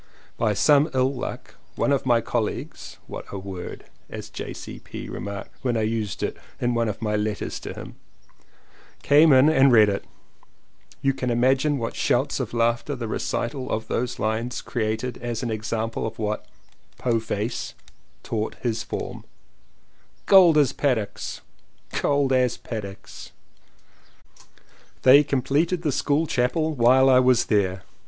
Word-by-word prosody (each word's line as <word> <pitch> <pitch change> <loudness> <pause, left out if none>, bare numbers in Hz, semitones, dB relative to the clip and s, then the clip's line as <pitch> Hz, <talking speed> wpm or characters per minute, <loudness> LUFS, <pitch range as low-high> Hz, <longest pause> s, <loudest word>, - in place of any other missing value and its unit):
By 110 -2 0
some 145 +6 +4
ill 130 +1 +2
luck 125 - -7 0.2
one - - +1
of 135 -2 0
my 120 -2 +4
colleagues 115 -1 -4
(what - - -8
a 100 - -5
word! 95 -2 -7 0.2
as - - -8
J.C.P. - - -8
remarked 100 -1 -6
when 120 -3 0
I 110 - 0
used 110 -2 -2
it - - -2 0.2
in 120 0 0
one 115 -1 +1
of 105 +2 -5
my 105 -1 0
letters 105 0 -2
to - - -7
him) - - -9 1.1
came 150 +2 +6
in 130 +2 +7
and 140 -4 +5
read 110 -3 +6
it. 100 - -3 1.0
You 135 0 +3
can 125 -1 -3
imagine 130 +5 +2
what 115 -2 -4
shouts 135 +4 +1
of 120 -4 -3
laughter 120 +4 0
the 120 -3 -5
recital 130 +4 -3
of 110 - -3
those 125 +1 -2
lines 110 +3 -2
created 115 +2 -2
as 120 0 -4
an 120 - -2
example 110 +1 -2
of 110 - -8
what 105 -1 -3 0.6
'To 120 -2 +2
face" 110 +1 -4 0.5
taught 110 -1 -3
his 115 -2 -1
form. 120 - -6 1.0
"Cold 180 -5 +7
as 145 -4 +3
paddocks! 120 -8 -2 0.5
cold 140 -2 +1
as 125 -2 +2
paddocks 100 -4 -8 0.8
\" - - -28
They 140 +3 +8
completed 150 +5 0
the 150 - +1
school 145 +4 +1
chapel 155 +4 0
while 130 +1 +5
I 130 -1 +6
was 130 -2 +4
there. 95 -4 0
120 Hz, 145 wpm, -24 LUFS, 110-135 Hz, 1.1 s, They